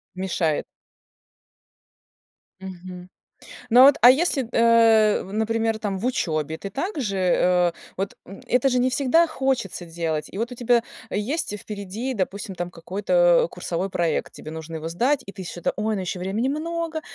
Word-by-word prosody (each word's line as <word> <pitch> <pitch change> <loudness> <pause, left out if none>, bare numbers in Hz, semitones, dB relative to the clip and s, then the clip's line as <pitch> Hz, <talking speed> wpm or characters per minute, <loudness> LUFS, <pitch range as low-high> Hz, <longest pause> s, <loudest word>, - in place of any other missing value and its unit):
Мешает. 175 -4 -1 1.9
Мгм. 180 -1 -9 0.6
Ну, 245 +3 +7
а - - +11
вот, 280 +1 +7
а 245 - +9
если, 280 0 +2
т 230 - -9
э, 225 -2 +5
в 190 - -11
например, 225 +1 0
там 200 -3 -3
в 230 - -3
учёбе 160 - -1
ты 200 - -7
так 310 - -4
же, 200 -6 -2
э, 180 -1 +3 0.2
вот, 195 +1 -3
м, 195 - -11
это 250 +2 +2
же 250 - +2
не 250 +1 +3
всегда 285 +6 +3
хочется 265 - -2
делать. 165 -2 -3
И 195 - -8
вот 230 +3 -2
у - - -5
тебя 240 0 +2 0.3
есть, 225 +7 -2
э, 210 - -3
впереди, 210 +5 -5
допустим, 195 -1 -3
там 175 0 -4
какой-то - - +2
курсовой 180 +3 -3
проект, 170 -3 -1
тебе 155 - -10
нужно 160 +1 -7
его 160 +1 -5
сдать 250 - +1
и 195 - -8
ты 190 - -8
что-то, 175 0 -3
"Ой, 215 +1 -1
ну 200 - -2
ещё 180 0 -4
времени 205 +8 -1
много, 325 +2 -3
210 Hz, 175 wpm, -23 LUFS, 180-250 Hz, 1.9 s, а